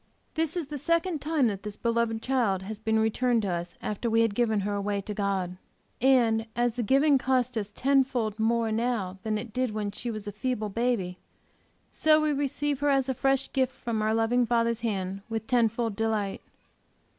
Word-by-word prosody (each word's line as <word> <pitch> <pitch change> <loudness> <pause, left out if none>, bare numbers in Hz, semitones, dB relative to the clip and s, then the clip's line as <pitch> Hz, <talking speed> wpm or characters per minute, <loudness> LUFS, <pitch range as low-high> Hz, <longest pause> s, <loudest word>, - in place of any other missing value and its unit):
This 325 +1 0
is 340 - -1
the 290 0 -6
second 335 0 0
time 305 -3 +1
that 200 -4 -1
this 210 0 -6
beloved 230 -1 0
child 230 -8 +1
has 210 +2 -6
been 220 0 +1
returned 225 +1 +2
to 195 - -1
us 175 0 -4
after 215 +3 -2
we 225 0 +3
had 225 -2 +2
given 220 -2 +1
her 205 +1 -2
away 200 0 -1
to 210 +2 -5
God. 195 -3 -1 0.4
And 230 -4 +3
as 240 -1 +1
the 245 - -2
giving 275 +5 +4
cost 255 -1 +1
us 210 -2 -3
ten 270 +4 +3
fold 230 -5 -3
more 225 0 +1
now 215 -5 -1
than 215 +1 -1
it 220 0 -7
did 255 -3 -1
when 210 -1 -2
she 225 +4 -5
was 215 -2 -5
a 205 - -4
feeble 215 0 -2
baby, 200 -5 -1 0.7
so 310 0 +4
we 305 -1 +1
receive 285 0 -1
her 290 0 +1
as 270 -1 +2
a - - +2
fresh 270 +1 0
gift 260 -1 +1
from 225 -2 -3
our 215 +1 +1
loving 235 +2 +2
Father's 235 -1 +1
hand, 195 -4 -2
with 225 -1 -3
ten 240 -2 +3
fold 230 -1 -2
delight. 215 -2 -1
230 Hz, 205 wpm, -28 LUFS, 210-255 Hz, 0.7 s, giving